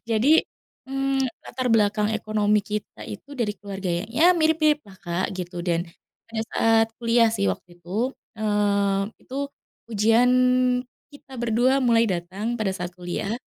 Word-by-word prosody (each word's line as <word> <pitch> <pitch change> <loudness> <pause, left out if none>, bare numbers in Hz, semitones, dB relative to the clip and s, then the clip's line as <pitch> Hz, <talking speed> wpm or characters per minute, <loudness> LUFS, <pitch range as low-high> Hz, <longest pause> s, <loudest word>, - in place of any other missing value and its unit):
jadi, 225 +5 +3 0.6
mmm, 270 0 0 0.2
latar 255 +1 -4
belakang 210 -2 +3
ekonomi 210 -1 +1
kita 210 0 -5
itu 280 +7 -9
dari 230 -5 0
keluarga 195 -2 -5 0.2
ya 320 +10 +5
mirip-mirip 315 -2 +3
lah, 190 - -14
Kak, 175 +1 -1
gitu 180 -1 -5
dan, 170 -1 0 0.4
pada 225 -1 -3
saat 225 0 +4
kuliah 230 -1 +3
sih 215 -3 -1
waktu - - -11
itu, 175 0 -16 0.5
eee, 200 -1 +1
itu 260 - -8 0.6
ujian 225 +4 +4 0.8
kita 285 -2 -16
berdua 240 +2 +2
mulai 230 -1 +4
datang 190 +6 -3
pada 215 -4 -1
saat 180 -2 -5
kuliah 195 +6 -3
215 Hz, 135 wpm, -24 LUFS, 195-240 Hz, 0.8 s, ya